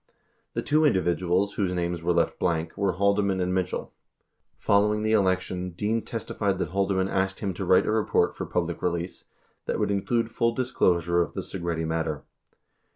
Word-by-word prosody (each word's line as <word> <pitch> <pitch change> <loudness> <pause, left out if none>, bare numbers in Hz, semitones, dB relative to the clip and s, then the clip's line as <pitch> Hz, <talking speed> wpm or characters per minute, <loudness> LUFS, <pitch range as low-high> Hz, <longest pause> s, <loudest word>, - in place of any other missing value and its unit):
6 - - -40 0.4
The - - 0
two 155 +1 +3
individuals 95 - +2
whose 95 -3 -1
names 85 -1 -2
were 85 +2 +1
left 85 -1 +1
blank 80 -1 -1
were 100 -2 0
Haldeman 100 +1 +1
and 90 0 0
Mitchell. 95 -1 -2 0.6
Following 105 +1 +2
the 110 - +1
election, 95 -3 +1
Dean 110 +5 -1
testified 105 -4 -2
that - - -2
Haldeman 95 0 +1
asked 95 0 -1
him 100 -2 -1
to 95 - -5
write 90 - +4
a - - 0
report 110 -1 +1
for - - -5
public - - -2
release 85 +1 -3 0.4
that - - 0
would - - +1
include 115 +4 0
full 115 0 +1
disclosure 85 -9 +2
of 85 - -2
the - - -3
Segretti 85 -3 -3
matter. 80 -2 -2
95 Hz, 175 wpm, -26 LUFS, 85-100 Hz, 0.6 s, write